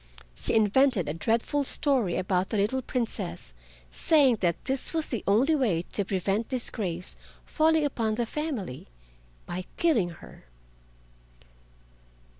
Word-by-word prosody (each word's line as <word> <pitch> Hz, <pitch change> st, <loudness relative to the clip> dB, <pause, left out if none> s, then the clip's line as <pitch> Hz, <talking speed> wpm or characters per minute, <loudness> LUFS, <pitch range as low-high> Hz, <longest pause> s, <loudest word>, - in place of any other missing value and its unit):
She 60 Hz, -, -1 dB
invented 220 Hz, -, +3 dB
a 150 Hz, -, -2 dB
dreadful 230 Hz, -, 0 dB
story 260 Hz, -, +1 dB
about 185 Hz, 0 st, 0 dB
the 220 Hz, -, -1 dB
little 215 Hz, +7 st, +1 dB
Princess, 220 Hz, -, -4 dB, 0.4 s
saying 275 Hz, -, +4 dB
that 175 Hz, -4 st, -1 dB
this 270 Hz, +4 st, -1 dB
was 320 Hz, -1 st, +1 dB
the 235 Hz, -, -4 dB
only 240 Hz, +10 st, +4 dB
way 220 Hz, -, +1 dB
to 205 Hz, -, 0 dB
prevent 195 Hz, +3 st, -1 dB
disgrace 195 Hz, -8 st, -2 dB, 0.3 s
falling 315 Hz, -1 st, +2 dB
upon 225 Hz, -6 st, -1 dB
the 240 Hz, +1 st, -1 dB
family—by 125 Hz, -, -7 dB
killing 285 Hz, -, +2 dB
her. 165 Hz, -, -13 dB
220 Hz, 120 wpm, -27 LUFS, 180-265 Hz, 0.4 s, saying